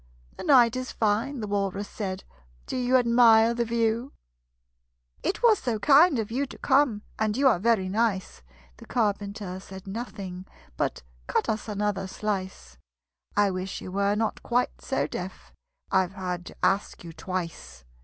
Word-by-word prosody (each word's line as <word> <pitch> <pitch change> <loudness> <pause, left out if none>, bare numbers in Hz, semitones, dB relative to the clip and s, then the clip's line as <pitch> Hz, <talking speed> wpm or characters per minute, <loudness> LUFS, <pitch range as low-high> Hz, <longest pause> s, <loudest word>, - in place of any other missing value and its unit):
"The - - -8
night 245 -5 +5
is 255 0 -4
fine," 225 +5 0
the 210 - -3
Walrus 200 0 -1
said. 190 -3 -5 0.4
"Do - - -5
you 255 +1 +3
admire 235 -2 +5
the 235 0 0
view? 230 +2 0 1.1
"It 400 - -2
was 450 -3 +6
so 240 -4 -1
kind 290 - +6
of 220 -1 -3
you 275 +4 -1
to - - -11
come, 265 -6 +2 0.2
And 215 0 0
you 275 0 +4
are 225 -9 +4
very 215 -2 +2
nice!" 200 - -1 0.4
The - - -14
Carpenter 200 -4 -2
said 190 0 -11
nothing 195 -3 -6 0.3
but - - -2 0.2
"Cut - - 0
us 220 0 -2
another 205 -2 -1
slice: 190 - -4 0.6
I 205 -1 +4
wish 185 +1 -4
you 185 - -8
were 200 +1 +1
not 220 0 -1
quite 245 +1 -1
so - - -1
deaf - - -7 0.4
I've 190 -1 +2
had 180 -2 -4
to - - -10
ask 195 -1 0
you 165 -1 -9
twice!" 160 - -6
210 Hz, 160 wpm, -26 LUFS, 190-235 Hz, 1.1 s, was